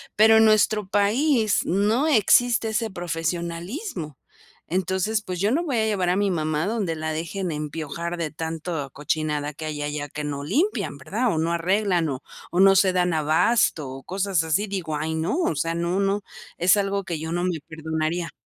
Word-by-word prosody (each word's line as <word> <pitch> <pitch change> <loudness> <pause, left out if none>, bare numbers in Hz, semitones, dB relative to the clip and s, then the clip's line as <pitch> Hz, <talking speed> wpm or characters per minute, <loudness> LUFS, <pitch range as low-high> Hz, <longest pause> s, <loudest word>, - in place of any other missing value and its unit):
Pero 220 +1 +6
en 220 - +6
nuestro 215 -1 +3
país 215 +3 +2
no 210 - +2
existe 235 -2 +4
ese 220 +1 -1
profesionalismo, 170 - -4 0.5
entonces, 190 +4 0
pues, 180 -3 -5
yo 205 +2 +2
no 320 +7 +1
voy 275 -7 -1
a 220 - +2
llevar 190 -5 0
a 180 - +2
mi 200 0 +1
mamá 155 -1 -1
donde 200 -6 -1
la 155 0 -3
dejen 170 +3 -3
empiojar 155 +3 -4
de 160 -3 -3
tanto 160 -2 -4
cochinada 150 0 -2
que 155 +2 -7
hay 150 -1 -4
allá 145 0 -3
que 150 +1 -6
no 140 -1 -4
limpian, 345 - 0
¿verdad? 250 -4 -1
O - - -2
no 165 +1 0
arreglan, 180 -1 +1
o 130 -2 -5 0.3
o 175 - 0
no 195 0 +7
se 190 0 +4
dan 180 -1 +1
abasto 155 - +2
o 135 +1 -8
cosas 190 -3 0
así. 160 +6 +1
Digo: 180 -6 -3
"Ay, 160 +2 -2
no, 160 - -1
o 340 - 0
sea, 165 +3 -1
no, 170 +3 -1
no. 200 +1 +1 0.4
Es 180 +3 +5
algo 200 0 0
que 170 -4 -4
yo 160 +1 -5
no 175 +1 -1
me 175 -3 -1
perdonaría. 160 +2 -3
175 Hz, 190 wpm, -24 LUFS, 160-205 Hz, 0.5 s, no